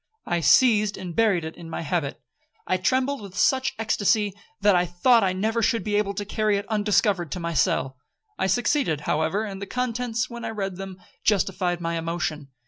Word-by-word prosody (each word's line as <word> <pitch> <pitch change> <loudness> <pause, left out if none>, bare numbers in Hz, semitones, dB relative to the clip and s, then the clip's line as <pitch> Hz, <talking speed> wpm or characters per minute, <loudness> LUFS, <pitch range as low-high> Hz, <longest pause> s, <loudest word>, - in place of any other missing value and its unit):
I 175 - 0
seized 210 - +4
and 180 -3 -7
buried 200 -7 +2
it 160 - -6
in 165 -1 -10
my - - -4
habit. 160 -3 -2 0.5
I 185 - +1
trembled 260 +7 0
with 200 -1 -10
such 260 +4 +2
ecstacy, 215 -2 +1 0.3
that 205 -1 +4
I 175 - +4
thought 210 +7 +3
I 190 - +2
never 220 +5 -1
should 230 0 +1
be 210 - -3
able 205 -1 0
to 205 - -3
carry 215 0 +1
it 200 - -5
undiscovered 205 - +1
to 180 - -4
my 170 0 -3
cell. 135 -2 +1 0.4
I - - 0
succeeded, 210 - +1
however; 160 +8 0
and 195 -2 -6
the 200 - -5
contents, 245 -2 -2
when 235 -1 -8
I - - -3
read 195 -4 -4
them, 190 -1 -8 0.2
justified 185 -3 +1
my 165 0 -2
emotion. 165 -3 -3
200 Hz, 195 wpm, -25 LUFS, 175-220 Hz, 0.5 s, seized